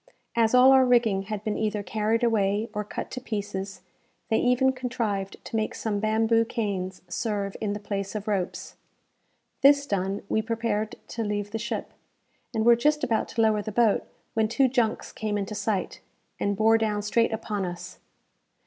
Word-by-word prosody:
As 230 0 +3
all 255 +1 +8
our 265 -1 +7
rigging 235 -6 +3
had 215 -1 -4
been 215 -1 -2
either 215 -1 -1
carried 220 +4 0
away, 210 -1 +1
or 210 -1 -2
cut 210 - -6
to 255 - -5
pieces, 200 -4 -4 0.5
they 220 - +3
even 250 +2 +3
contrived 230 -6 -3
to - - -6
make 220 -1 -1
some 210 -2 -2
bamboo 225 +2 +3
canes 195 -5 -3
serve 200 +2 -2
in 210 -2 -1
the 205 - -4
place 200 0 -4
of 210 0 -4
ropes. 195 -4 -3 0.8
This 280 +1 +6
done, 195 -5 -2
we 220 - +1
prepared 220 -1 -2
to 230 - -3
leave 205 -1 -2
the 225 - -3
ship, 235 - -4 0.6
and 220 -2 -1
were 235 0 +8
just 300 +5 +1
about 225 -2 +1
to 225 - -1
lower 215 -1 +3
the 215 - -5
boat, 220 -1 +2 0.3
when 220 -1 +2
two 265 +4 +3
junks 240 -3 0
came 215 -1 -2
into 200 +1 -3
sight, 205 -2 -2 0.4
and 200 -1 0
bore 225 +1 +4
down 210 -2 0
straight 230 +3 +2
upon 210 -2 -3
us. 175 0 -6
215 Hz, 175 wpm, -26 LUFS, 205-230 Hz, 0.8 s, all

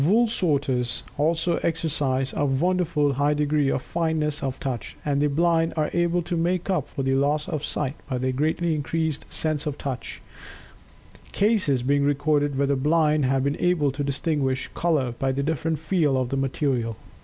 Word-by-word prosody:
Wool 215 +10 +4
sorters 135 - 0
also 165 +3 +1
exercise 140 -5 0
a - - 0
wonderfully 150 0 +1
high 145 +2 +1
degree 150 -1 +1
of 130 - -1
fineness 160 -3 -1
of 135 -1 -3
touch. 130 -4 -4
And 145 -1 +1
the 150 - +3
blind 165 +2 +2
are 155 -1 0
able 175 0 +1
to 175 - -3
make 175 +3 0
up 160 -8 0
for 135 - -4
the 135 0 +1
loss 145 +3 +1
of 150 -1 -3
sight 140 -2 -2 0.2
by 130 - -1
their 130 +1 0
greatly 160 +5 0
increased 155 0 -2
sense 155 -2 0
of 145 -1 -3
Touch, 130 -3 -5 1.1
cases 195 - +2
being 140 +2 +2
recorded 145 0 +1
where 140 - +2
the 140 0 +1
blind 150 +1 +2
have 135 0 +1
been 140 +1 0
able 170 -6 +2
to 145 +2 -3
distinguish 140 -1 -1
color 150 -8 +1
by 135 0 +1
the 140 +1 -1
different 160 +1 -1
"feel" 155 -4 +1
of 130 -2 -1
the 135 - -1
material. 130 -4 -1
145 Hz, 180 wpm, -24 LUFS, 135-165 Hz, 1.1 s, Wool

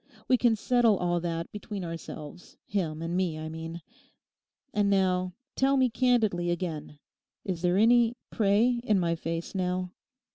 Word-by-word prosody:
We 255 - +5
can 240 -2 +3
settle 230 -1 +3
all 175 -1 0
that 170 -1 -3
between 205 -2 -6
ourselves—him 165 +1 -5
and 170 +1 -2
me, 180 -4 0
I 155 0 -5
mean. 165 +1 -7 0.9
And 205 -1 +2
now 185 -2 +1 0.2
tell 275 +1 +3
me 255 -2 +3
candidly 220 -8 +2
again—Is 170 +1 -6
there 180 +1 +2
any 235 +2 +5 0.2
"prey" 220 +4 +3
in 210 -5 +2
my 170 -2 +1
face 165 0 -4
now? 180 -1 -1
185 Hz, 140 wpm, -28 LUFS, 170-215 Hz, 0.9 s, We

